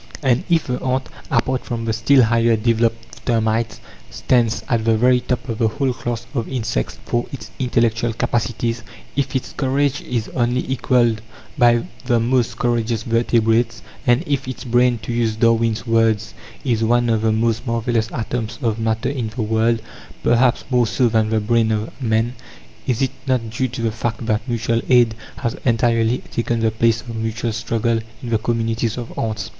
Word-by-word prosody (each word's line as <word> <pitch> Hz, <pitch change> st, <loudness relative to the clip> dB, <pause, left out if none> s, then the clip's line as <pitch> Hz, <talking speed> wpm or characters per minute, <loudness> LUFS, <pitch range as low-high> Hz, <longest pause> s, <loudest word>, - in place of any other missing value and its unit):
And 130 Hz, +3 st, +2 dB
if 165 Hz, -2 st, +3 dB
the 125 Hz, -1 st, -3 dB
ant 130 Hz, 0 st, 0 dB, 0.2 s
apart 130 Hz, 0 st, +1 dB
from 115 Hz, -1 st, -4 dB
the 110 Hz, -, 0 dB
still 125 Hz, +4 st, +4 dB
higher 115 Hz, 0 st, +3 dB
developed 115 Hz, +1 st, -1 dB
termites 110 Hz, -1 st, 0 dB, 0.3 s
stands 120 Hz, -3 st, +1 dB
at 115 Hz, -3 st, +1 dB
the 115 Hz, 0 st, +3 dB
very 125 Hz, +2 st, +4 dB
top 125 Hz, 0 st, -3 dB
of 115 Hz, -2 st, -4 dB
the 115 Hz, -, +3 dB
whole 130 Hz, +3 st, 0 dB
class 120 Hz, -1 st, -4 dB
of 120 Hz, -5 st, -2 dB
insects 110 Hz, -, -2 dB
for 120 Hz, 0 st, -1 dB
its 120 Hz, -5 st, -8 dB
intellectual 120 Hz, -2 st, +1 dB
capacities; 115 Hz, 0 st, -1 dB, 0.3 s
if 140 Hz, -1 st, -1 dB
its 130 Hz, -, -2 dB
courage 140 Hz, +1 st, 0 dB
is 120 Hz, -3 st, -3 dB
only 125 Hz, 0 st, 0 dB
equalled 120 Hz, -3 st, +2 dB, 0.3 s
by 120 Hz, -4 st, +4 dB, 0.2 s
the 120 Hz, -3 st, +3 dB
most 120 Hz, -1 st, +1 dB
courageous 115 Hz, -2 st, 0 dB
vertebrates; 115 Hz, 0 st, +1 dB, 0.2 s
and 120 Hz, +5 st, +4 dB
if 140 Hz, -4 st, -1 dB
its 130 Hz, -, -5 dB
brain 120 Hz, 0 st, +3 dB
to 120 Hz, -, -3 dB
use 115 Hz, -2 st, 0 dB
Darwin's 115 Hz, 0 st, +2 dB
words 115 Hz, -2 st, +2 dB, 0.3 s
"is 115 Hz, -4 st, +1 dB
one 120 Hz, +2 st, +3 dB
of 110 Hz, -2 st, +2 dB
the 110 Hz, 0 st, +2 dB
most 115 Hz, +2 st, 0 dB
marvellous 115 Hz, -1 st, 0 dB
atoms 115 Hz, -1 st, -3 dB
of 115 Hz, -1 st, 0 dB
matter 110 Hz, 0 st, 0 dB
in 125 Hz, -5 st, -2 dB
the 110 Hz, +1 st, -3 dB
world, 110 Hz, +1 st, +1 dB, 0.4 s
perhaps 120 Hz, +1 st, +3 dB
more 125 Hz, -2 st, +3 dB
so 120 Hz, +2 st, +2 dB
than 110 Hz, -1 st, +2 dB
the 110 Hz, 0 st, +2 dB
brain 110 Hz, +1 st, +2 dB
of 110 Hz, 0 st, -1 dB
man," 115 Hz, 0 st, +1 dB, 0.5 s
is 125 Hz, 0 st, +1 dB
it 135 Hz, -, +1 dB, 0.2 s
not 120 Hz, -4 st, 0 dB
due 130 Hz, +3 st, 0 dB
to 120 Hz, -1 st, -5 dB
the 115 Hz, -, +1 dB
fact 115 Hz, +1 st, -3 dB
that 110 Hz, +1 st, -1 dB
mutual 115 Hz, 0 st, 0 dB
aid 120 Hz, -3 st, +5 dB, 0.2 s
has 120 Hz, -4 st, -2 dB
entirely 115 Hz, 0 st, +2 dB
taken 115 Hz, 0 st, -1 dB
the 115 Hz, -1 st, +2 dB
place 115 Hz, 0 st, +2 dB
of 115 Hz, -2 st, -8 dB
mutual 115 Hz, +1 st, -2 dB
struggle 115 Hz, +1 st, 0 dB, 0.2 s
in 120 Hz, -, -4 dB
the 110 Hz, -2 st, +2 dB
communities 115 Hz, 0 st, -1 dB
of 120 Hz, -1 st, -6 dB
ants? 110 Hz, -2 st, -2 dB
115 Hz, 180 wpm, -20 LUFS, 110-125 Hz, 0.5 s, aid